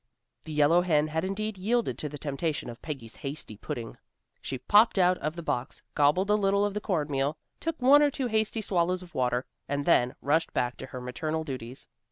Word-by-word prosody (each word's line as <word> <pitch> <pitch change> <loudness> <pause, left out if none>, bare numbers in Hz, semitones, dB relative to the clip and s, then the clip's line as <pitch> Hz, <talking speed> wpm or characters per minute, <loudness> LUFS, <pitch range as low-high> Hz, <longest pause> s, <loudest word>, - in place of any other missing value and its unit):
The 160 - -7
yellow 150 +3 +4
hen 155 -4 +2
had 160 +1 -1
indeed 195 +1 -3
yielded 230 +4 +1
to 150 - -3
the 145 - -7
temptation 145 -2 -3
of 115 - -13
Peggy's 130 -8 -7
hasty 135 -6 -6
pudding. 115 +2 -6 0.4
She 135 - -4
popped 205 - +4
out 180 -1 +4
of 155 +2 -3
the 170 - -6
box, 125 -4 -3
gobbled 165 +8 +3
a - - +6
little 200 -1 +3
of 205 - -2
the 210 - -3
corn 165 -8 0
meal, 140 +3 0 0.2
took 330 -1 -3
one 275 +3 +7
or 295 - +5
two 270 -1 -3
hasty 220 -1 0
swallows 180 -2 0
of 175 - -15
water, 125 0 0 0.2
and 145 0 -1
then 125 +1 +3
rushed 160 +4 +1
back 125 0 0
to 130 - -7
her 130 -1 -7
maternal 155 +5 -3
duties. 130 -4 -6
160 Hz, 210 wpm, -28 LUFS, 135-195 Hz, 0.4 s, one